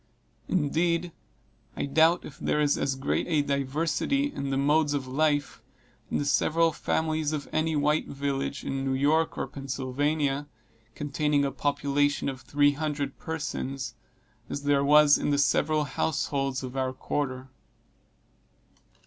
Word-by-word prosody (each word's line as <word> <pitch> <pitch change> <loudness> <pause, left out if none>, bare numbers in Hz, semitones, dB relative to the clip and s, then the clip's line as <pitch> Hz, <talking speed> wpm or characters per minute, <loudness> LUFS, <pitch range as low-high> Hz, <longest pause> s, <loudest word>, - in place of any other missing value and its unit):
Indeed, 170 +1 +1 0.7
I - - -1
doubt 160 +5 +3
if 150 - -11
there - - 0
is 145 -1 +3
as 135 - -1
great 135 +1 -1
a 155 -4 +2
diversity 150 - 0
in 140 - -3
the 135 - 0
modes 145 +1 +2
of 135 -2 -2
life, 145 +2 0 0.5
in - - 0
the 145 - -1
several 165 +3 +3
families 155 0 -1
of 145 -2 -3
any 160 0 +1
white 150 +1 +1
village 140 0 -3
in 135 0 -3
New 135 -1 0
York 155 +4 +2
or - - -1
Pennsylvania, 140 +2 -2 0.5
containing 145 0 0
a 140 - -1
population 145 +1 0
of 130 -1 -7
three 145 +3 +3
hundred 145 -1 -3
persons, 140 -4 -4 0.6
as 140 - -4
there 145 -1 +3
was 150 0 +6
in - - -1
the 145 - +2
several 150 +2 +2
households 140 -2 -1
of 130 0 -6
our 130 -1 -1
quarter. 130 -1 -3
145 Hz, 140 wpm, -27 LUFS, 135-155 Hz, 0.7 s, was